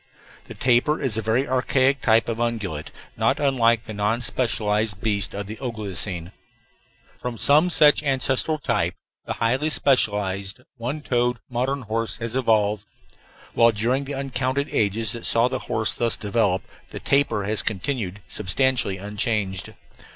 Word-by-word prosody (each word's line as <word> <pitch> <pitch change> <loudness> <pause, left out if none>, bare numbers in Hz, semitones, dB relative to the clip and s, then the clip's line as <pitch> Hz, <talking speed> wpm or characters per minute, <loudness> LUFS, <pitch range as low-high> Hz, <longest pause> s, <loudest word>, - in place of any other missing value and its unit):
The - - -10
tapir 125 +5 +2
is 130 -6 0
a 110 - 0
very 115 +6 +1
archaic 130 +1 +2
type 115 0 +3
of 115 -1 -3
ungulate, 105 -10 -2 0.3
not - - +2
unlike 115 -5 +3
the 110 - -7
non 105 +3 0
specialized 110 -4 0
beasts 100 -4 -1
of 100 0 -4
the 110 +3 -7
Oligocene. 100 -7 -4 0.9
From 120 -1 -5
some 150 +9 +4
such 150 -4 +5
ancestral 135 +2 0
type 105 - -1 0.3
the - - -1
highly 130 +7 0
specialized 100 -8 +1 0.2
one 125 +6 -4
toed 125 -3 0
modern 130 +3 -1
horse 115 0 -2
has 115 +1 -5
evolved, 105 -4 +1 0.7
while 115 0 +5
during 120 +6 0
the 140 +1 -5
uncounted 135 +1 -1
ages 105 +1 +1
that 115 - -5
saw 115 +1 +4
the 130 0 -3
horse 110 0 0
thus 115 -1 0
develop 100 -3 0 0.3
the - - -7
tapir 135 -7 +1
has 105 +2 -1
continued 105 -2 -3
substantially 120 - +1
unchanged. 105 -1 -2
115 Hz, 145 wpm, -23 LUFS, 105-130 Hz, 0.9 s, such